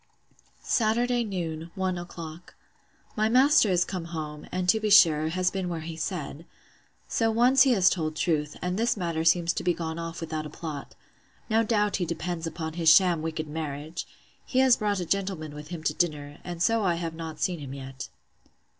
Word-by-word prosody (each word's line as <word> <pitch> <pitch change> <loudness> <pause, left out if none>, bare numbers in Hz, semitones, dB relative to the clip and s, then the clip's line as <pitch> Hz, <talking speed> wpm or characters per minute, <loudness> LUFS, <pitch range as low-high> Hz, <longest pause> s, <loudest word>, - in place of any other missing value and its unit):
Saturday 240 +2 +1
noon, 170 -6 -4
one 185 -1 -1
o'clock. 175 -1 -9 0.6
My 215 0 +2
master 255 -1 +5
is 180 -1 +3
come 180 -4 -5
home; 155 -3 -6
and, 185 0 -2
to 220 +5 +4
be 215 0 -1
sure, 155 -6 +6
has 180 +2 0
been 190 -2 -3
where 165 -2 -3
he 160 +1 -6
said. 160 -2 -5 0.6
So 225 -1 +1
once 245 +4 +4
he 265 -2 +6
has 190 -5 +4
told 160 -4 +1
truth; 150 -3 -1
and 180 +3 -1
this 230 0 +1
matter 170 -3 -2
seems 170 +1 +3
to - - -4
be 175 -1 +1
gone 165 -1 -4
off 165 0 -5
without 155 -2 -4
a - - -10
plot: 150 -2 -7 0.6
No 220 +1 +4
doubt 210 -2 +1
he 180 - -1
depends 170 0 -3
upon 160 -1 -5
his 165 -1 +3
sham 175 0 +5
wicked 160 -1 -3
marriage! 155 +1 -5 0.4
He 255 - -4
has 260 -2 +6
brought 205 -2 0
a 175 - -3
gentleman 185 -5 -2
with 150 0 -9
him 165 -1 -7
to 150 - +1
dinner; 150 -4 -2
and 175 -1 -3
so 225 +1 +2
I 175 -3 +2
have 165 -1 -4
not 160 -1 -7
seen 180 -3 -1
him 140 -2 -7
yet. 135 -1 -8
170 Hz, 195 wpm, -27 LUFS, 160-195 Hz, 0.6 s, sure